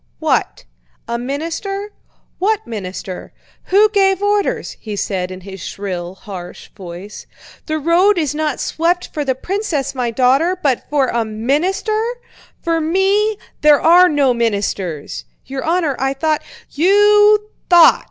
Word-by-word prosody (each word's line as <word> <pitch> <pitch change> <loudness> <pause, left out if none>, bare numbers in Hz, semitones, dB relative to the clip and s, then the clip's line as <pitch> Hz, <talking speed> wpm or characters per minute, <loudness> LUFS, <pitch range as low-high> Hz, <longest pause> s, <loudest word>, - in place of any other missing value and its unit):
"What? - - -1 0.4
A 235 0 -2
minister? 335 - -4 0.5
What 435 +3 0
minister? 190 -3 -7 0.3
Who 410 +3 +5
gave 385 -2 +2
orders?" 410 0 0
he 215 -2 -6
said 185 -2 -2
in 185 0 -8
his 190 0 -10
shrill, 185 -2 -5
harsh 185 -3 -9
voice. 185 +1 -9 0.4
"The 310 -1 -1
road 345 +6 +3
is 305 -4 0
not 305 -2 -2
swept 345 +2 -1
for 300 - -2
the 265 -2 0
princess 340 -3 -2
my 250 -3 -1
daughter, 270 +10 +2
but 275 -8 -1
for 280 -3 +1
a 235 -1 0
minister! 300 - -1 0.6
For 330 -1 0
me, 390 +6 +1 0.2
there 300 -1 +6
are 355 +2 +6
no 285 -5 +2
ministers!" 200 -8 -2 0.2
"Your 265 +1 -5
honor, 325 -4 0
I 270 +1 0
thought..." 310 +2 0 0.3
"You 415 +5 +4 0.2
thought!" 345 -2 +7
300 Hz, 135 wpm, -18 LUFS, 230-375 Hz, 0.6 s, thought